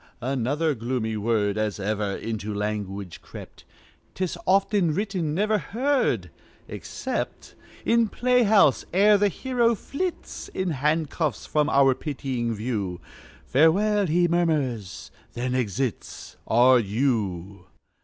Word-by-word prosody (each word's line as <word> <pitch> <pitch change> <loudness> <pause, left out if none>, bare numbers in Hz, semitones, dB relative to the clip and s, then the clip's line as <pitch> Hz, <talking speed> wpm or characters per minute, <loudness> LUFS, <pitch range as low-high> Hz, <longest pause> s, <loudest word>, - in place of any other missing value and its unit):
Another 140 +5 0
gloomy 115 -2 -2
word 105 -1 0
As 105 -2 -2
ever 100 0 -2
into 110 -2 -4
language 100 -3 -4
crept. - - -12 0.5
'Tis 185 -2 -2
often 195 -4 +2
written, 185 -6 -2
never 210 +3 +1
heard, 260 - 0 0.4
Except - - -5 0.3
In 230 -1 +3
playhouse. 220 - +3
Ere 205 +2 +5
the 205 - +4
hero 235 +2 +1
flits 340 - -5
In 185 -2 -1
handcuffs 150 +2 -1
from 150 0 +1
our 135 -2 +5
pitying 130 -4 -3
view. 105 -5 -3 0.5
"Farewell!" 195 +8 +3
he 175 +2 +3
murmurs, 145 - -1 0.2
then 125 +1 -2
exits 125 -1 -3
R.U. 110 -6 +1
135 Hz, 105 wpm, -25 LUFS, -, 0.5 s, Ere